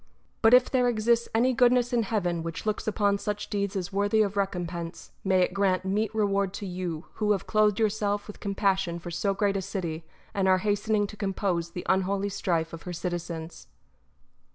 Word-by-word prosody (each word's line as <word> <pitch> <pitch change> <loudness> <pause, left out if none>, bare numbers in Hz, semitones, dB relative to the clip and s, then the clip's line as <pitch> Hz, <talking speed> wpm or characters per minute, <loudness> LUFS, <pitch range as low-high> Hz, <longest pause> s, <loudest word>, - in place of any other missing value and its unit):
But 225 +2 +7
if 250 0 +5
there 250 -2 +3
exists 235 0 +2
any 250 +3 +3
goodness 245 0 +3
in 240 - +3
heaven 180 -6 -1
which 165 +3 -5
looks 215 0 -2
upon 205 -1 +1
such 210 0 -4
deeds 200 0 -1
as 190 -1 -3
worthy 205 +2 +3
of 200 -1 -3
recompense, 175 -3 -3
may 190 -1 +3
it - - -1
grant 190 -2 +1
meet 205 +2 0
reward 200 -2 +1
to 200 - -5
you, 175 -3 -4 0.2
who 210 0 +4
have 195 - -3
clothed 215 -1 +2
yourself 205 -1 0
with 210 - -10
com 200 -1 -3
passion 190 -4 +1
for 170 0 -7
so 195 +4 0
great 200 0 +1
a - - -1
city, 175 -4 -4 0.3
and 195 -1 +1
are 185 0 +5
hastening 205 0 +1
to 205 - -9
compose 190 -4 -1
the 175 +1 -7
unholy 195 +1 +1
strife 170 -5 -1
of 165 - -7
her 180 - -6
citizens 170 -1 -5
200 Hz, 195 wpm, -27 LUFS, 180-210 Hz, 0.3 s, But